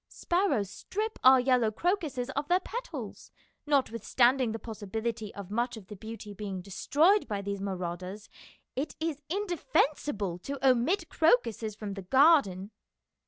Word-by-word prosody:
Sparrows 345 - 0
strip 430 - -4
our 260 0 +8
yellow 250 -3 +3
crocuses 285 - -1
of 285 +2 -3
their 360 +3 +4
petals. 480 +6 -7 0.4
Notwith 270 -6 +1
standing 250 -1 +3
the 225 - -3
possibility 220 0 -4
of 200 -1 -8
much 240 +2 -1
of 200 -4 -13
the 210 - -7
beauty 220 0 -8
being 195 -2 -5
destroyed 295 - +2
by 200 -2 -3
these 200 0 -4
marauders, 185 +1 -5 0.5
it 285 +4 -3
is 320 -2 -2
indefensible 300 - 0
to 280 +9 -5
omit 310 +9 +2
crocuses 235 -7 +2
from 210 -2 -5
the 195 - -6
garden." 220 - +4
235 Hz, 140 wpm, -29 LUFS, 205-300 Hz, 0.5 s, our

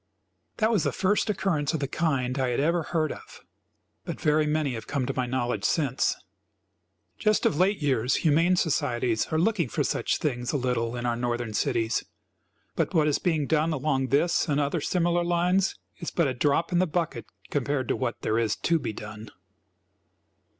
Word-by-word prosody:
That 220 +1 +2
was 210 -6 +2
the - - +1
first 205 +3 +1
occurrence 175 -7 0
of - - -1
the 140 - -1
kind 135 -4 -1
I 130 - +1
had 120 - 0
ever 165 +4 +2
heard 155 -2 -1
of, - - -11 0.6
but - - -6
very 150 0 +2
many 150 -3 0
have 110 -2 -7
come 140 -3 -1
to - - -2
my 125 -1 -1
knowledge 120 -4 -1
since. 140 -6 +1 1.0
Just 215 -1 +2
of - - +3
late 190 -1 +2
years 130 -3 +2
humane 165 +3 +3
societies 125 -9 0
are 160 - -1
looking 170 - +1
for - - 0
such - - 0
things 125 -4 -2
a 145 - 0
little 125 -2 -1
in 120 0 -4
our 120 -1 +1
Northern 120 -2 -2
cities, 110 +1 0 0.7
but - - -1
what 155 -2 +4
is 150 - +1
being 160 -5 0
done 160 +2 +1
along 135 -2 0
this 155 +5 +2
and 145 0 +2
other 145 +3 0
similar 175 +1 +1
lines 175 +2 +1 0.2
is 170 - -4
but 170 -4 +1
a 130 - -1
drop 145 +7 +1
in 175 - +2
the 185 - +2
bucket, 155 -7 -2 0.2
compared 140 -2 -1
to - - +2
what 120 -4 -3
there 110 +1 +1
is 110 -2 +1
to 170 -1 +1
be 110 - -4
done. 105 +1 -9
145 Hz, 190 wpm, -27 LUFS, 125-170 Hz, 1.0 s, what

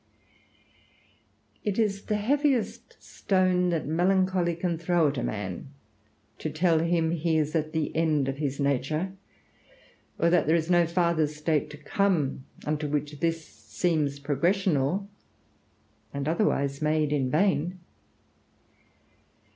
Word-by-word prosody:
It 205 -2 -1
is 200 -3 0
the 210 - 0
heaviest 265 +2 0
stone 185 -2 +1
that 165 -3 -1
melancholy 180 +1 +1
can 170 -1 -2
throw 170 -2 +2
at 140 -2 -3
a - - -2
man, 100 0 -4 0.7
to 155 - -3
tell 160 +2 +2
him 165 0 +1
he 165 -1 +1
is 155 -1 0
at 155 -1 0
the 160 -2 -2
end 155 -4 +2
of 135 0 -2
his 140 -2 -3
nature; 145 +6 0 1.0
or 170 - +2
that 175 -4 +3
there 160 - +4
is 165 +1 0
no 175 -1 +4
farther 170 -2 +2
state 150 0 -1
to 150 - -10
come, 150 -4 0 0.2
unto 150 0 -1
which 145 0 -3
this 165 -1 -1
seems 145 +6 -2
progressional, 170 +4 +1 1.0
and 140 0 -4
otherwise 140 -5 0
made 155 -1 +1
in 135 -3 0
vain. 180 +2 +1
160 Hz, 130 wpm, -27 LUFS, 150-180 Hz, 1.0 s, there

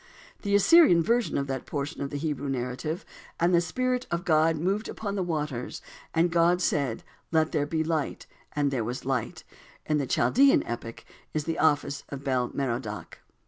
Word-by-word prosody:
The 200 -1 +1
Assyrian 205 - +6
version 235 +5 +1
of 140 - 0
that 135 -2 -4
portion 145 +1 -4
of 140 - -2
the 145 - -4
Hebrew 145 -2 -3
narrative: 135 - -3 0.3
"And 175 +2 +3
the 170 - +5
Spirit 255 +8 -1
of 170 +1 -2
God 160 -1 +4
moved 195 +7 -1
upon 205 -2 -4
the 200 - -1
waters, 150 -8 -3 0.3
and 170 +1 +2
God 170 +1 +3
said, 140 -9 0 0.3
'Let 160 -1 +2
there 145 -2 0
be 160 +1 0
light,' 160 -2 -2 0.3
and 145 -1 +1
there 125 -4 -1
was 125 +4 -5
light," 130 -4 -2 0.4
in 150 -1 +1
the 140 - -2
Chaldean 265 - +4
epic 115 -1 -6 0.3
is 155 - 0
the 165 +2 -3
office 145 -2 +1
of 140 -1 -7
Bel 130 -3 0
Merodach. 120 -5 -4
155 Hz, 180 wpm, -27 LUFS, 135-175 Hz, 0.4 s, Assyrian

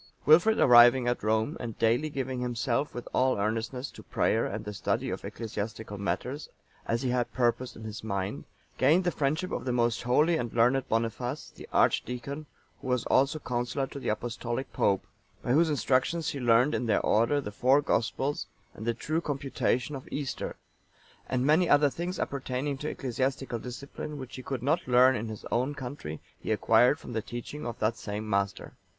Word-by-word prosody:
Wilfrid 175 +9 +6
arriving 120 0 +7
at 120 - 0
Rome, 110 +7 0
and 115 -3 -6
daily 120 +7 +2
giving 130 -3 -3
himself 120 +3 -1
with 120 - -6
all 130 -2 +2
earnestness 115 +5 -2
to - - -12
prayer 115 - +1
and 105 +1 -5
the 105 - -5
study - - -1
of - - -5
ecclesiastical 110 -1 -5
matters, 130 +8 -3 0.4
as 115 +3 0
he 125 - 0
had 125 -1 0
purposed 125 0 0
in 110 - -10
his 110 -1 -7
mind, 100 -2 -3 0.3
gained 155 +8 +4
the 175 - +1
friendship 155 +5 -1
of - - -3
the 130 - -1
most 120 -2 +1
holy 150 +7 +3
and 120 -6 -3
learned 125 +3 +3
Boniface, 115 +5 -2
the - - -12
archdeacon,(899) 140 +5 0 0.4
who - - -7
was 125 -1 0
also 135 +4 +3
counsellor 125 0 -2
to 140 - -8
the - - -3
Apostolic 120 +3 -3
Pope, 100 -2 +1 0.4
by - - -1
whose 160 +5 +4
instruction 145 +3 +1
he 145 -2 -3
learned 125 +4 +4
in 120 - -1
their 105 - +2
order 115 +7 +3
the 120 -7 -5
four 130 +7 +4
Gospels, 135 +3 -1 0.3
and 110 - -8
the 115 - +1
true 155 +7 -1
computation 140 -2 -1
of 130 - -8
Easter; 140 -2 -3 0.7
and 130 0 0
many 160 +4 +4
other 145 -1 +5
things 175 +4 -4
appertaining 135 +1 -2
to 150 - -3
ecclesiastical 130 -1 -2
discipline, 140 +5 -7
which 130 -3 -8
he 130 - -7
could 130 -2 -4
not 150 +3 +1
learn 130 +1 +6
in 110 0 -3
his 110 - -8
own 130 +5 0
country, 125 - -6 0.2
he - - -4
acquired 125 +5 +4
from 120 - -9
the 110 - -1
teaching 120 +6 -6
of 120 - -5
that 110 +2 0
same 105 +1 -5
master. 100 -1 -1
125 Hz, 185 wpm, -29 LUFS, 115-140 Hz, 0.7 s, arriving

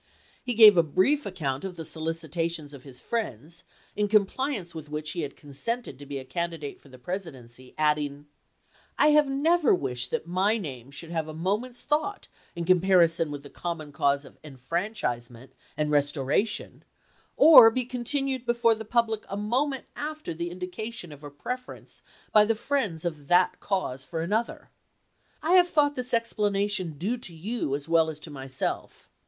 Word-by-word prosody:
He 245 -2 -2
gave 215 -4 +9
a - - +8
brief 185 - +1
account 145 -8 -3
of 190 -2 -5
the 165 - -7
solicitations 160 -1 -3
of 140 - -10
his 130 -2 -10
friends, 170 - -4 0.3
in 210 0 +1
compliance 210 -1 0
with 155 -2 -8
which 150 0 -3
he 170 - -3
had 145 -2 -5
consented 150 - -5
to 145 - -10
be 140 0 -4
a 130 - -7
candidate 165 -2 -4
for 140 - -18
the 130 - -13
Presidency, 130 -7 -8
adding: 150 -1 0 0.7
I 300 - +5
have 300 -1 +5
never 300 - +3
wished 125 -5 -2
that - - -2
my 190 +6 +1
name 135 - -7
should 160 +4 -10
have 160 -2 -2
a 155 - -7
mo 185 +5 +1
ment's 245 0 -8
thought 310 +8 -1 0.3
in 170 0 -3
comparison 175 -3 +4
with 145 -1 -6
the 140 - -12
common 165 -4 -5
cause 140 0 +1
of - - -16
enfranchisement 130 - -4 0.2
and 150 0 0
restoration, 145 - 0 0.5
or 260 -8 +10
be 250 +2 -2
continued 260 +1 -1
before 235 -1 +3
the 220 0 -6
public 225 -1 0
a 200 - -4
moment 260 +6 -1
after 305 - -5
the 170 +2 -4
indication 180 +1 -7
of 145 0 -12
a 145 - -7
preference 250 - -7 0.3
by 210 - +7
the 225 +2 +1
friends 215 - -2
of 155 -4 -4
that 180 +2 +3
cause 160 -10 -2
for 165 +3 -4
another. 215 +7 -2 0.7
I 320 - 0
have 355 -1 +5
thought 290 -3 +3
this 250 -1 -4
explanation 205 -7 0
due 210 - -1
to 180 -8 -9
you 185 - -2
as 145 +1 -6
well 165 -1 +3
as 155 -1 -7
to 155 - -7
myself. 135 -1 -4
175 Hz, 170 wpm, -27 LUFS, 145-230 Hz, 0.7 s, or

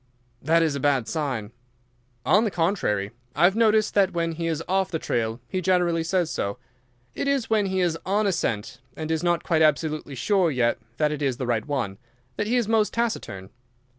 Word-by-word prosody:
"That 165 +3 +3
is 160 -3 +1
a 140 - -3
bad 135 -4 +1
sign." 130 -9 -3 0.7
"On 205 +7 +5
the 220 - +1
contrary, 165 - 0 0.2
I 155 - +1
have 190 +3 +5
noticed 220 -2 +3
that 195 -2 +3
when 165 -1 0
he 165 +1 -3
is 165 0 -2
off 190 0 +1
the 165 - -1
trail 115 -5 -2
he 185 - -2
generally 175 -2 +2
says 175 0 0
so. 100 0 -2 0.6
It - - -3
is 275 -5 0
when 210 -2 +3
he 190 0 0
is 165 -2 0
on 205 +3 +1
a 200 - +3
scent 110 - -2 0.2
and 160 0 -4
is 160 - 0
not 175 -1 +1
quite 160 -2 +1
absolutely 155 -1 +1
sure 185 - +2
yet 125 -5 +1 0.2
that 150 -1 +2
it 150 -1 -4
is 135 -4 0
the 130 - -3
right 120 0 -1
one 120 -9 -2 0.4
that 210 - -2
he 240 - +1
is 240 -4 +1
most 220 -1 +2
taciturn. 215 - -3
165 Hz, 205 wpm, -25 LUFS, 140-190 Hz, 0.7 s, On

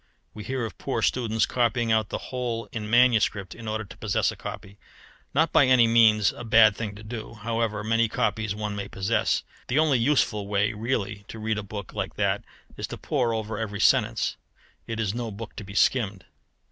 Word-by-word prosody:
We 105 - -8
hear 130 0 -2
of 110 - -9
poor - - -2
students 115 -3 +1
copying 120 -1 +1
out 110 -2 +2
the - - -2 0.2
whole 120 -2 -2
in 105 -2 -5
manuscript 115 -4 +3
in 115 -1 -10
order 110 0 -2
to 95 -3 -13
possess 105 -3 0
a - - -9
copy 100 +1 -8 0.5
not - - +2
by - - +5
any 130 -2 +6
means 110 -3 +5
a - - -9
bad 110 -2 +6
thing 105 -2 -5
to 105 - -11
do, 110 +1 -7
however 115 -1 -2
many 115 +1 +2
copies 110 -2 -1
one 105 -1 -3
may 100 -1 -4
possess. 95 +3 0 0.2
The 130 - 0
only 150 -5 +4
useful 115 -6 +1
way 105 +2 +1
really 105 -2 -2
to - - -9
read 110 0 -1
a - - -2
book 100 -1 -8
like - - -4
that - - 0 0.3
is - - -4
to - - -7
pore 125 -6 0
over 110 -1 -3
every 105 -2 -4
sentence: - - +2 0.5
it 115 -1 -4
is 105 -3 0
no 120 -1 -3
book 110 +1 -8
to - - -5
be 100 0 -10
skimmed. 105 -6 +1
110 Hz, 200 wpm, -26 LUFS, 105-115 Hz, 0.5 s, any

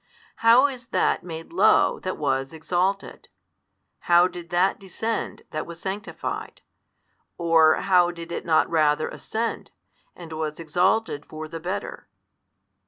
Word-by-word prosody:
How 230 +4 +6
is 255 -4 -4
That - - +1
made 165 -1 -8
low 200 +5 +4
that 185 - -4
was 135 -1 -1
exalted, 180 +5 -2 0.8
how 175 +1 +6
did 175 -1 -10
That 180 +3 +2
descend 220 +4 -4
that 155 - -4
was 170 0 -9
sanctified, 195 +3 -5 0.8
or 165 -2 +5
how 180 -2 +4
did 170 -1 -8
it - - -4
not 160 -1 +3
rather 155 -2 +2
ascend, 230 +1 -4 0.5
and 165 -2 -10
was 155 0 -4
exalted 175 0 +1
for 155 0 -7
the 165 +1 -7
better? 180 +4 -5
175 Hz, 130 wpm, -24 LUFS, 160-195 Hz, 0.8 s, How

